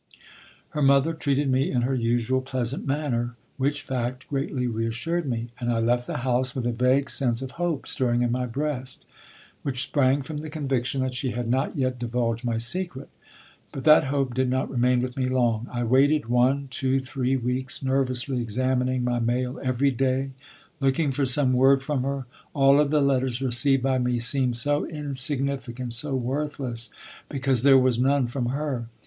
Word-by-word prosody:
Her 150 - -3
mother 140 +3 +4
treated 145 -3 0
me 130 +1 +2
in 125 -2 0
her 130 +2 0
usual 120 +1 +1
pleasant 130 0 -3
manner, 125 -5 -1 0.2
which 145 +2 -1
fact 125 0 -3
greatly 135 -2 -2
reassured 125 +9 -2
me; 120 -1 -3
and 120 -1 -1
I 115 - 0
left 120 +2 +1
the - - -3
house 130 +1 +1
with 125 -3 -2
a 120 - +1
vague 130 +4 +2
sense 125 -3 +1
of 130 - -5
hope 170 -3 -2
stirring 120 -2 +1
in 120 - 0
my 125 +1 -1
breast, 135 0 -4 0.6
which 130 -2 -2
sprang 140 0 +2
from 155 +1 -6
the 155 +1 -6
conviction 135 -4 -1
that 130 -1 -2
she 130 0 -2
had 120 -1 -3
not 130 +5 0
yet 130 -2 -1
divulged 115 -1 -1
my 120 -2 -1
secret. 140 +3 -3 0.6
But 135 - -6
that 155 -2 +6
hope 135 -2 -1
did 130 0 0
not 130 +1 -1
remain 125 -1 +2
with 125 0 -4
me 130 -2 -1
long. 120 -3 +1
I 120 0 -2
waited 140 +5 +3
one, 130 +3 +2
two, 130 +1 +1
three 130 0 -1
weeks, 125 +2 -2
nervously 130 -1 0
examining 125 +2 0
my 120 -1 0
mail 125 +2 -1
every 130 +1 +1
day, 135 +1 0 0.5
looking 135 +2 +1
for 135 0 0
some 130 0 +3
word 135 +1 +4
from 145 -2 -1
her. 135 0 -3 0.3
All 140 0 +5
of 150 -1 +3
the 150 0 +2
letters 130 -3 +1
received 130 +1 +2
by 130 -1 +1
me 125 -1 0
seemed 125 +1 +1
so 145 +5 +1
insignificant, 135 -4 -3
so 135 +4 -1
worthless, 130 -2 -3 0.4
because 135 -4 +1
there 135 0 +7
was 130 -2 +2
none 135 +1 +3
from 120 0 -2
her. 135 -3 -2
130 Hz, 180 wpm, -25 LUFS, 125-140 Hz, 0.6 s, there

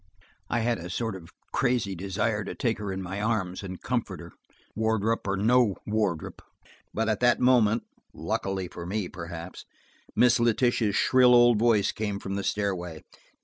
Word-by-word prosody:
I 120 - 0
had 115 -2 0
a 85 +2 -7
sort 110 +2 -2
of 85 -2 -11 0.2
crazy 125 -6 +1
desire 100 +4 -1
to - - -6
take 115 -5 -1
her 105 -2 -4
in 95 0 -4
my 95 +3 -5
arms 105 -5 -1
and 95 -2 -7
comfort 125 -2 -2
her, - - -10 0.4
Wardrop 110 0 0
or 95 0 0
no 115 0 +3
Wardrop. 105 -7 -2 0.5
But 110 +1 -1
at 110 -2 0
that 120 0 +3
moment, 120 -3 +3 0.3
luckily 95 -1 -3
for 85 0 -8
me, 100 -1 -2
perhaps, 85 0 -8 0.5
Miss 120 -1 +4
Letitia's 115 -2 +2
shrill 125 +1 +5
old 120 -2 +6
voice 110 -3 +3
came 105 -2 -3
from 100 0 -5
the 100 0 -2
stairway. 90 -6 -2
105 Hz, 165 wpm, -27 LUFS, 95-115 Hz, 0.5 s, old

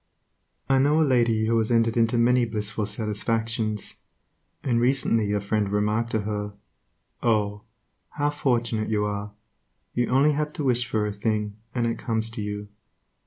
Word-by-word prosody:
I 135 -1 +3
know 145 +4 +3
a 160 - +4
lady 120 -5 +2
who 115 +1 +2
has 110 - 0
entered 115 -1 +2
into 115 0 +2
many 125 +1 +4
blissful 105 -2 -2
satisfactions, 110 +1 -2 0.6
and 120 -3 +1
recently 120 -5 +2
a 105 - +1
friend 100 0 0
remarked 105 +3 0
to 110 - +1
her, 105 0 -3 0.7
"Oh, 105 -3 0 0.4
how 145 0 -1
fortunate 120 -6 0
you 105 -1 +1
are! 105 0 -3 0.6
You 120 -1 +1
only 140 +4 +4
have 150 +1 -2
to 150 - -4
wish 125 -2 +2
for 110 -3 0
a 105 - -2
thing, 105 0 -1 0.2
and 120 -2 +1
it 115 - -1
comes 115 -1 -2
to 115 -1 -3
you." 105 0 -5
115 Hz, 165 wpm, -25 LUFS, 105-120 Hz, 0.7 s, a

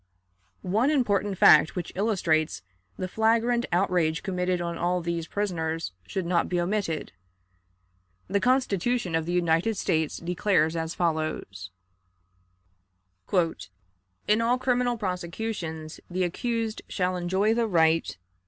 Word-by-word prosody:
One 215 +9 +2
important 205 -9 +1
fact 155 0 +6
which 180 -3 -4
illustrates 165 - 0 0.3
the 185 - -3
flagrant 230 +4 +1
outrage 175 -3 +1
committed 180 -2 -1
on 170 -1 -3
all 175 +2 0
these 170 -1 -3
prisoners 165 - -2 0.2
should 190 -2 -3
not 170 -1 +1
be 180 - 0
omitted. 175 -3 -2 1.2
The 200 +2 +1
Constitution 245 -5 +1
of 165 0 0
the - - -1
United 175 +4 +1
States 160 -4 0
declares 170 -2 +1
as 165 0 -3
follows: 155 - -2 2.6
"In 215 +2 +3
all 240 +2 +2
criminal 250 -1 +1
prosecutions, 180 -4 -4
the 185 +1 -1
accused 225 +5 -2
shall 185 -1 -1
enjoy 190 +5 +1
the 230 0 +1
right 165 - +2
180 Hz, 115 wpm, -26 LUFS, 165-215 Hz, 2.6 s, fact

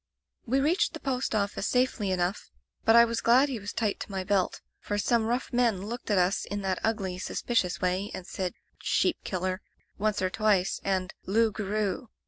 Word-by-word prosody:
"We 265 +4 +2
reached 320 +8 +2
the - - -6
post 255 -4 -1
office 200 -1 0
safely 250 -5 +1
enough, 180 +2 -1 0.4
but 225 - +6
I 235 0 +9
was 230 0 -2
glad 255 +5 +5
he 250 -4 -3
was 205 0 -5
tight 215 -3 -1
to - - -6
my 190 -1 -3
belt, 190 -1 +1 0.2
for 205 - -3
some 225 +2 +2
rough 245 +3 -2
men 235 -6 +2
looked 235 +2 -6
at 205 - +3
us 180 +2 +2
in 205 0 -4
that 190 -1 0
ugly, 195 -5 -1
suspicious 185 -3 -1
way 185 +3 0
and 180 - -7
said 185 -1 -3 0.3
'sheep 355 - +1
killer' 185 0 -2 0.4
once 215 0 +1
or 185 0 0
twice, 200 -3 +1
and 190 -1 -1
'loup 220 +3 +3
garou.' 210 +1 -2
205 Hz, 190 wpm, -28 LUFS, 190-235 Hz, 0.4 s, I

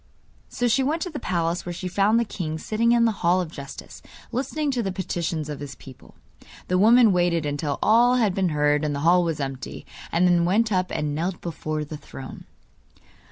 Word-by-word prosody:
So 245 - -1
she 235 +3 +3
went 305 +5 0
to 360 - -5
the 295 - -5
palace, 170 -1 -1
where 175 - -5
she 185 +2 -5
found 200 +5 +2
the 235 - +1
king 160 -7 -4
sitting 225 +7 0
in 235 -1 +4
the 225 - +3
Hall 175 +2 +3
of 175 -3 -3
Justice 140 -4 -10 0.3
listening 285 +4 -1
to 250 -3 -1
the 195 -3 -2
petitions 170 -4 -3
of 150 -2 -6
his 140 -1 -7
people. 130 -2 -15 0.5
The 180 0 +2
woman 230 +2 +6
waited 175 -3 +1
until 145 0 -2
all 240 +3 +5
had 220 -6 +2
been 185 -1 +1
heard 150 -1 +1
and 150 -1 -1
the 140 - -3
hall 175 +1 +5
was 165 -3 -2
empty, 135 -2 -5 0.3
and 175 +2 +3
then 175 -1 +3
went 215 +6 +2
up 185 -2 +1
and 150 -1 -2
knelt 175 +4 -2
before 155 -2 -4
the 150 +1 -7
throne. 135 -2 -10
175 Hz, 205 wpm, -24 LUFS, 155-220 Hz, 0.5 s, woman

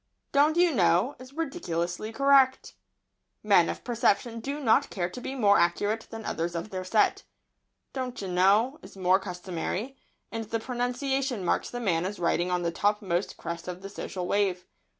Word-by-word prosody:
"Don't 295 +3 +4
you 350 -2 +4
know" 180 +5 +3
is 255 +1 -12
ridiculously 215 - -3
correct. 275 +1 +3 0.7
Men - - +5
of - - -5
perception 230 -1 +1
do 280 +5 -4
not 230 -6 +3
care 180 -2 -3
to 250 - -8
be 265 - -5
more 205 -6 +4
accurate 205 +6 0
than 225 -1 -8
others 170 +1 -2
of 170 +5 -4
their 185 -1 -4
set. 210 +4 +2 0.7
"Don't 255 -2 -4
chi 200 - -4
know" 200 - +3
is - - -13
more 185 0 +3
customary, 185 +6 -4 0.4
and 225 0 -4
the 230 +2 -2
pronunciation 250 -1 -2
marks - - 0
the 245 - -5
man 175 -8 +1
as 205 +1 -6
riding 175 +1 +1
on 180 -1 0
the 170 - 0
topmost 200 -1 0
crest 170 +1 -6
of 180 +1 -6
the 195 - -6
social 185 -2 -5
wave. 185 -2 0
205 Hz, 170 wpm, -28 LUFS, 180-250 Hz, 0.7 s, Men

